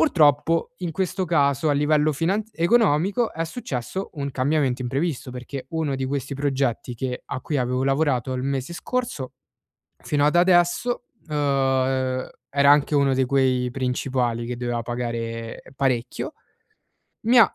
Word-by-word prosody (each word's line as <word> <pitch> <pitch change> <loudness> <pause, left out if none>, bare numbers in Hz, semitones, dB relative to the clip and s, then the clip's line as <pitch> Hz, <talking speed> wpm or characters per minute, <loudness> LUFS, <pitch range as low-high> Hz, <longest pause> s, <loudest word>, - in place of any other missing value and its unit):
Purtroppo 165 - +3
in 175 -3 -3
questo 185 +2 -1
caso 145 -2 +2
a - - +4
livello 150 +1 +3
finanz 195 +9 -1
economico 200 +3 +3
è 165 - -1
successo 160 - -4
un 140 -1 -3
cambiamento 135 -1 +1
imprevisto, 135 +1 -2
perché 130 +2 -7
uno 160 -4 -1
di 130 0 -2
questi 140 0 -3
progetti 135 -3 -1
che 125 +1 -4
a 140 - -4
cui 150 -3 -1
avevo 125 +1 0
lavorato 135 -3 +1
il 125 - -2
mese 135 +3 -2
scorso 175 - -3 0.7
fino 145 -1 0
ad 150 - +2
adesso, 180 +7 +3 0.2
uhm, 150 -1 -3 1.1
era 140 0 +5
anche 145 +1 +3
uno 140 -1 +3
di 130 0 +2
quei 130 -1 +2
principali 125 -2 -1
che 125 - -3
doveva 120 -1 -2
pagare 115 -1 -4
parecchio, 130 -3 -1 1.0
mi 245 +2 +6
ha 225 - +6
140 Hz, 145 wpm, -24 LUFS, 125-165 Hz, 1.1 s, mi